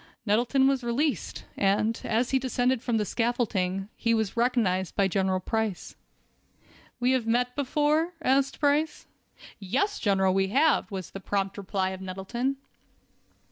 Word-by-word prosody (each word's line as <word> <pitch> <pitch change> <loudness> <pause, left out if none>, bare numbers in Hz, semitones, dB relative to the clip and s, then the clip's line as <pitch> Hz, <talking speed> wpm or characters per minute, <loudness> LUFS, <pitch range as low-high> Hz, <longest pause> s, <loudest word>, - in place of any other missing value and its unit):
Nettleton 240 +6 +3
was 270 -2 +1
released, 265 +5 -1
and, 205 +3 +1
as 235 +2 0
he 265 - +3
descended 255 -1 0
from 240 -2 0
the 210 - 0
scaffolding, 200 -5 -1
he 230 -1 +1
was 220 -3 -1
recognized 225 -7 +1
by 200 - +3
General 190 0 0
Price. 220 0 -3 1.0
"We 250 +1 +2
have 255 -3 0
met 245 +2 +1
before?" 300 +4 +1
asked 270 -2 +1
Price. 300 +1 +1 0.5
"Yes, 265 - -1
General, 190 -2 +2
we 190 0 +2
have," 280 +7 +2
was 190 -4 -6
the 195 - -7
prompt 195 0 -2
reply 190 -1 -2
of 190 0 -7
Nettleton. 195 +9 -3
230 Hz, 140 wpm, -27 LUFS, 195-260 Hz, 1.0 s, Nettleton